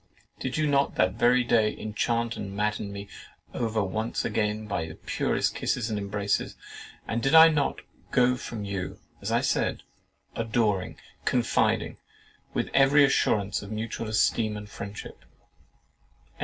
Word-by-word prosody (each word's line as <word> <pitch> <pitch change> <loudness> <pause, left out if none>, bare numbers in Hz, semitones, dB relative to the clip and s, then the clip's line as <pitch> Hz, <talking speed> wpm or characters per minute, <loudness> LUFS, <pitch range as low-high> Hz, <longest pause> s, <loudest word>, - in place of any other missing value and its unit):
Did 130 +1 -3
you 155 - +2
not 140 -1 +2
that 90 0 +2
very 125 +1 +4
day 110 -2 +2
enchant 115 +2 -1
and 100 -1 -6
madden 105 0 -1
me 100 0 -7 0.5
over 110 -2 -1 0.4
again 105 0 -1
by 90 -6 -2
the 80 - -9
purest - - -1
kisses 110 - -1
and 105 - -1
embraces, 100 0 -1 0.5
and 115 +1 -1
did 135 +5 +3
I 160 0 +10
not 150 -3 0 0.3
go 125 0 +3
from 115 -4 -6
you 100 -2 -4 0.2
(as - - -3
I - - +3
said) - - 0 0.5
adoring, 110 -4 0 0.3
confiding, - - +1 0.5
with - - -2
every 140 +1 +6
assurance 105 -8 +2
of 100 - -9
mutual 110 +1 -4
esteem 110 0 +1
and 105 0 -8
friendship?" 100 0 -8
110 Hz, 140 wpm, -27 LUFS, 100-120 Hz, 0.5 s, I